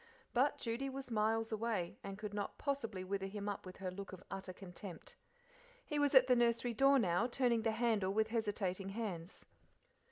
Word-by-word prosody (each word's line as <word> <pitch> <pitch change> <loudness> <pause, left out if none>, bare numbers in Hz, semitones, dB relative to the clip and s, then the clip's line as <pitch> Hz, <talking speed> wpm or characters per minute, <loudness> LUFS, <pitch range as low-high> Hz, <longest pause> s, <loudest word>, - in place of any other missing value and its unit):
But 265 +4 +3
Judy 235 +4 -2
was 270 -1 -6
miles 225 +1 +1
away, 220 -5 -1
and 195 0 -5
could 210 -1 -5
not 205 -1 -3
possibly 225 -10 -2
wither 195 +1 -2
him 205 +1 -5
up 205 -2 -4
with 185 - -9
her 185 -1 -3
look 195 +1 -7
of 190 - -9
utter 195 -1 -5
contempt. 185 0 -9 0.7
He 300 - -1
was 290 -1 +3
at 260 -1 +9
the 255 -1 +5
nursery 235 0 +2
door 275 +4 +6
now, 190 -1 +2
turning 240 -2 +2
the 225 0 +1
handle 220 -4 +2
with 220 +2 +2
hesitating 205 -4 -1
hands. 195 -5 -5
220 Hz, 185 wpm, -37 LUFS, 195-240 Hz, 0.7 s, at